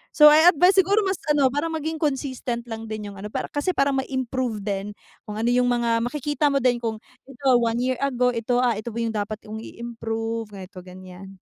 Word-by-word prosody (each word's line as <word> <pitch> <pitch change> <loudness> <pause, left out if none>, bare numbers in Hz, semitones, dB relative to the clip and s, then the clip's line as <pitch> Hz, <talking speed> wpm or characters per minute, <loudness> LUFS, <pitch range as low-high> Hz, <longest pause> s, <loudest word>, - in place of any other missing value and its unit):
So 300 - +7
I 315 +3 +6
advice 360 +4 +4
siguro 400 +3 +3
mas 380 -1 -1
ano 285 -3 +3
parang 295 +3 -1
maging 320 +1 -3
consistent 260 -5 -2
lang 225 -1 -7
din 210 -2 -5
yung 200 - -12
ano 205 - -6
para - - -3
kasi 330 +5 -1
para 275 0 +2
ma-improve 260 -4 -2
din 200 0 -4 0.3
kung 210 - -6
ano 225 - -1
yung 250 0 +3
mga 235 -1 +1
makikita 295 +4 -1
mo 280 - +1
din 245 -2 +3
kung 225 -2 -2 0.3
ito 270 +1 -5
one 230 0 0
year 255 +1 0
ago 250 -3 +1
ito, 235 +1 -1
ah, 245 -2 +3
ito 220 - -6
pa 230 - -8
yung 225 - -2
dapat 210 0 -3
kong 220 +1 -7
i-improve, 225 -1 -5
ganito-ganyan. 185 0 -11
240 Hz, 205 wpm, -24 LUFS, 220-275 Hz, 0.3 s, So